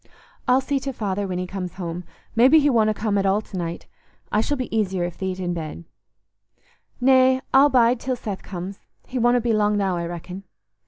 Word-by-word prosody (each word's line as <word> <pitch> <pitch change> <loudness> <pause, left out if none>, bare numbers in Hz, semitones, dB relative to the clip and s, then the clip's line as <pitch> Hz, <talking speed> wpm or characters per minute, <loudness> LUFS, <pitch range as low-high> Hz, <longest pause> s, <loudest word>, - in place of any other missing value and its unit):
"I'll 255 +1 +4
see 275 +1 -1
to 270 +1 -4
Father 200 -3 -2
when 180 -1 -3
he 180 - -2
comes 180 -1 -6
home; 175 -1 -5 0.3
maybe 260 +7 +6
he 290 -1 +3
wonna 220 -3 +3
come 210 -1 0
at 195 - 0
all 195 +2 +3
to 205 - -12
night. 170 -2 -4 0.5
I 210 - +3
shall 290 +5 -1
be 255 -3 -4
easier 190 -4 0
if 175 -1 -5
thee't 190 -1 -3
i' 185 - -3
bed." 170 -2 -4 1.2
"Nay, 260 0 +5
I'll 275 +2 +7
bide 245 -2 +4
till 255 +1 -2
Seth 205 -5 -6
comes. 190 +1 -7 0.3
He 255 - -4
wonna 240 +1 +4
be 230 -1 +1
long 210 -1 +2
now, 190 -3 0
I 170 0 -3
reckon." 180 +3 -7
205 Hz, 205 wpm, -23 LUFS, 185-250 Hz, 1.2 s, I'll